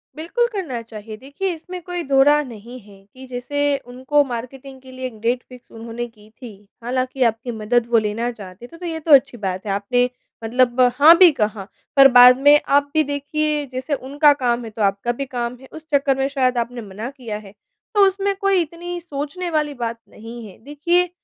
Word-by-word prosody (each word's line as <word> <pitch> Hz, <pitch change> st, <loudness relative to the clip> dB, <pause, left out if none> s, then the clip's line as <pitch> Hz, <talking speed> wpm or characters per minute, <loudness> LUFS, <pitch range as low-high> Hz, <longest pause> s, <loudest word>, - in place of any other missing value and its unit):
बिल्कुल, 345 Hz, +10 st, -1 dB
करना 305 Hz, -, -4 dB
चाहिए 220 Hz, -1 st, -10 dB
देखिए 285 Hz, -, -4 dB
इसमें 360 Hz, +3 st, -9 dB
कोई 355 Hz, 0 st, -5 dB
दोराय 280 Hz, +2 st, +4 dB
नहीं 240 Hz, +1 st, -11 dB
है 205 Hz, -1 st, -16 dB, 0.2 s
कि 260 Hz, +1 st, -12 dB
जैसे 250 Hz, +3 st, -5 dB, 0.3 s
उनको 260 Hz, +4 st, +1 dB
मार्केटिंग 260 Hz, +3 st, -8 dB
के 260 Hz, 0 st, -14 dB
लिए 255 Hz, 0 st, -5 dB, 0.2 s
डेट 245 Hz, +2 st, 0 dB
फ़िक्स 250 Hz, -1 st, -15 dB
उन्होंने 230 Hz, +1 st, -6 dB
की 215 Hz, -2 st, -20 dB
थी। 245 Hz, -, -8 dB, 0.3 s
हालाँकि 255 Hz, +2 st, -1 dB
आपकी 230 Hz, +2 st, -7 dB
मदद 230 Hz, +2 st, +1 dB
वो 235 Hz, -, +5 dB
लेना 220 Hz, +2 st, -1 dB
चाहते 200 Hz, 0 st, -11 dB
थे 335 Hz, -, -15 dB
तो 355 Hz, -, -8 dB
ये 325 Hz, -2 st, -4 dB
तो 325 Hz, -, 0 dB
अच्छी 265 Hz, -2 st, -14 dB
बात 185 Hz, +1 st, -3 dB
है। 205 Hz, -, -2 dB
आपने 245 Hz, +6 st, +1 dB, 0.3 s
मतलब 245 Hz, +2 st, +1 dB, 0.2 s
हाँ, 305 Hz, +5 st, +8 dB
भी 365 Hz, -2 st, +8 dB
कहा 210 Hz, -6 st, -3 dB, 0.3 s
पर 275 Hz, -1 st, +9 dB
बाद 250 Hz, +1 st, +9 dB
में 295 Hz, 0 st, +8 dB, 0.2 s
आप 285 Hz, 0 st, 0 dB
भी 315 Hz, -1 st, +3 dB
देखिए 295 Hz, +1 st, -2 dB
जैसे 255 Hz, +4 st, -3 dB
उनका 285 Hz, +2 st, +3 dB
काम 240 Hz, 0 st, +1 dB
है, -, -, -7 dB
तो 215 Hz, -, -7 dB
आपका 200 Hz, +4 st, 0 dB
भी -, -, -1 dB
काम 245 Hz, -1 st, -4 dB
है 265 Hz, -, -14 dB
उस 315 Hz, 0 st, -11 dB
चक्कर 275 Hz, -2 st, +2 dB
में 270 Hz, 0 st, 0 dB
शायद 255 Hz, -3 st, 0 dB
आपने 240 Hz, +1 st, -3 dB
मना 210 Hz, +3 st, -7 dB
किया 245 Hz, -6 st, -7 dB
है। -, -, -13 dB, 0.4 s
तो 405 Hz, -1 st, +6 dB
उसमें 395 Hz, +1 st, -1 dB
कोई 395 Hz, -2 st, +2 dB
इतनी 345 Hz, +2 st, -6 dB
सोचने 325 Hz, +3 st, -5 dB
वाली 305 Hz, -2 st, -1 dB
बात 230 Hz, 0 st, -5 dB
नहीं 230 Hz, +1 st, -10 dB
है 190 Hz, -, -14 dB
देखिए 340 Hz, +6 st, 0 dB
260 Hz, 200 wpm, -20 LUFS, 235-295 Hz, 0.4 s, पर